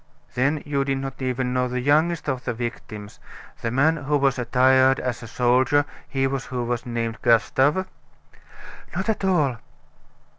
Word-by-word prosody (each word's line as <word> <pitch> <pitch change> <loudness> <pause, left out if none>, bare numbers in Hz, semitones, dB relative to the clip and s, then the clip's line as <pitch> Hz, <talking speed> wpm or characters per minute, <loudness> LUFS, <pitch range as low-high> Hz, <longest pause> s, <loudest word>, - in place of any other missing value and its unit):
"Then 140 +4 0
you 140 -2 0
did 135 0 -1
not 135 0 -6
even 130 -1 -1
know 125 0 +1
the 125 0 -3
youngest 155 +6 +2
of 130 -3 -2
the 120 -2 -3
victims, 110 -3 -7 0.4
the 115 - -1
man 145 +7 +2
who 145 0 0
was 135 -2 +1
attired 130 +2 +4
as 125 -1 -3
a 115 - -8
soldier, 125 +5 +2 0.2
he 135 -1 -1
who 135 -2 -2
was 120 0 -3
named 115 -2 -3
Gustave?" 135 - +3 1.1
"Not - - -2
at 215 - -1
all." 155 -10 +2
130 Hz, 155 wpm, -23 LUFS, 125-140 Hz, 1.1 s, attired